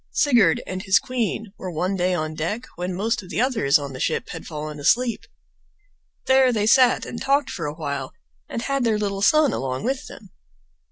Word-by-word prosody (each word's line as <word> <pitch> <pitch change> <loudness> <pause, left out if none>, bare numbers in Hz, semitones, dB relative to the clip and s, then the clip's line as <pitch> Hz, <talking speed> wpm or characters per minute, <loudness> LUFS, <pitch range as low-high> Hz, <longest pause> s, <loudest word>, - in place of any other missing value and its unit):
Sigurd 245 -8 +3
and 185 0 -5
his 190 +1 +4
queen 225 -5 -3
were 185 - -5
one 180 +3 -1
day 180 0 +1
on 155 -2 -3
deck 205 +11 -3
when 180 +1 -4
most 225 +5 -1
of 185 - -13
the - - -3
others 230 - +3
on 140 -2 -6
the 130 - -8
ship - - -1
had - - -8
fallen 150 -1 -6
asleep. 235 - +1 1.0
There 265 -1 +5
they 215 -3 0
sat 255 +2 +4
and 235 - -7
talked 275 +1 +1
for - - -4
a 145 - -5
while, 140 -4 -4 0.4
and 235 - -4
had 275 -2 0
their 225 -3 +2
little 200 -2 -2
son 300 +5 +4
along 130 -1 -3
with 260 +3 -2
them. 200 -5 -13
200 Hz, 200 wpm, -23 LUFS, 160-250 Hz, 1.0 s, There